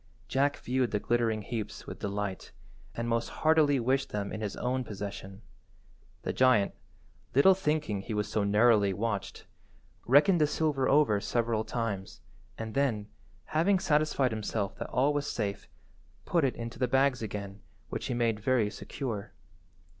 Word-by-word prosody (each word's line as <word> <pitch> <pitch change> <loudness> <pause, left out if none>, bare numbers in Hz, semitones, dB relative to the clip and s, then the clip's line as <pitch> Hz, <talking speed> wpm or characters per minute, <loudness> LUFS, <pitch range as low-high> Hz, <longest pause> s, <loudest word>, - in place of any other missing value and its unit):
Jack 140 +4 +1
viewed 125 -1 0
the 105 - -1
glittering 115 -1 0
heaps 110 -1 -5
with - - -8
delight, 100 -1 -4 0.4
and 115 0 -3
most 115 0 0
heartily 155 -3 +3
wished 130 +3 +1
them 100 -1 -3
in 110 - -5
his 105 -2 -3
own 130 +1 -1
possession. 100 -2 -7 0.8
The - - -2
giant 125 -6 +4 0.6
(little 165 +8 +7
thinking 150 - -1
he 110 +2 -5
was 105 0 -1
so 105 - 0
narrowly 105 -1 +4
watched) 105 0 -3 0.6
reckoned 155 +7 +5
the 150 - +5
silver 145 -4 0
over 135 -8 +4
several 115 -1 0
times, 110 -5 -4 0.4
and 110 -1 -5
then, 115 -7 0 0.4
having 180 +6 +2
satisfied 150 -6 +1
himself 105 -2 -2
that - - -5
all 140 +4 +2
was 145 -1 -1
safe, 100 -3 -3 0.6
put 170 -3 +1
it 135 - +1
into 115 0 -7
the 125 - +2
bags 135 0 +2
again, 100 -2 -6 0.3
which - - -4
he 125 - -2
made 115 -3 +1
very 115 -2 +1
secure. 110 0 -5
115 Hz, 155 wpm, -30 LUFS, 105-135 Hz, 0.8 s, little